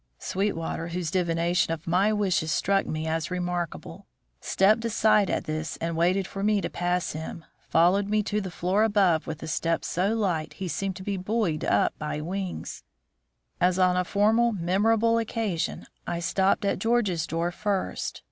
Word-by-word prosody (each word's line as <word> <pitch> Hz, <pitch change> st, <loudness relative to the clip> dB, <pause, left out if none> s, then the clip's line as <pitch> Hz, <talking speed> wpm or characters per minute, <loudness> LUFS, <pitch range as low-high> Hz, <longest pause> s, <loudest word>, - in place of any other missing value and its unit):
Sweetwater, 170 Hz, -4 st, -2 dB
whose 170 Hz, -2 st, -3 dB
divination 170 Hz, -1 st, +1 dB
of 165 Hz, 0 st, -4 dB
my 185 Hz, +5 st, +2 dB
wishes 185 Hz, -7 st, +1 dB
struck 195 Hz, +5 st, +1 dB
me 155 Hz, 0 st, -3 dB
as 160 Hz, 0 st, -1 dB
remarkable, 180 Hz, -2 st, -4 dB, 0.3 s
stepped 210 Hz, -, +3 dB
aside 215 Hz, -3 st, +3 dB
at -, -, -1 dB
this, 155 Hz, +1 st, -4 dB
and, 165 Hz, 0 st, -3 dB
waiting 180 Hz, +4 st, +2 dB
for 195 Hz, +1 st, -7 dB
me 210 Hz, 0 st, +3 dB
to -, -, -4 dB
pass 175 Hz, 0 st, -1 dB
him, 160 Hz, +1 st, -7 dB, 0.2 s
followed 185 Hz, +5 st, +3 dB
me 210 Hz, 0 st, +1 dB
to 210 Hz, +1 st, -1 dB
the 190 Hz, -, -5 dB
floor 180 Hz, +4 st, 0 dB
above 195 Hz, -7 st, +2 dB
with 160 Hz, 0 st, -5 dB
a -, -, -5 dB
step 165 Hz, +1 st, -1 dB
so 195 Hz, +5 st, 0 dB
light 180 Hz, -8 st, -1 dB
he 190 Hz, -, -5 dB
seemed 195 Hz, +2 st, -2 dB
to 190 Hz, -, -8 dB
be 200 Hz, 0 st, -2 dB
buoyed 185 Hz, -4 st, -1 dB
up -, -, +2 dB
by 150 Hz, 0 st, -3 dB
wings. 185 Hz, +4 st, -5 dB, 0.8 s
As 180 Hz, 0 st, +3 dB
on 185 Hz, -1 st, +3 dB
a 180 Hz, -, +2 dB
former 220 Hz, +5 st, +3 dB
memorable 220 Hz, +5 st, +2 dB
occasion, 220 Hz, -6 st, -2 dB, 0.2 s
I 170 Hz, -, -2 dB
stopped 190 Hz, +3 st, +1 dB
at 200 Hz, -, 0 dB
George's 205 Hz, -7 st, +1 dB
door 165 Hz, +2 st, -1 dB
first. 200 Hz, +1 st, -2 dB
185 Hz, 170 wpm, -26 LUFS, 165-205 Hz, 0.8 s, stepped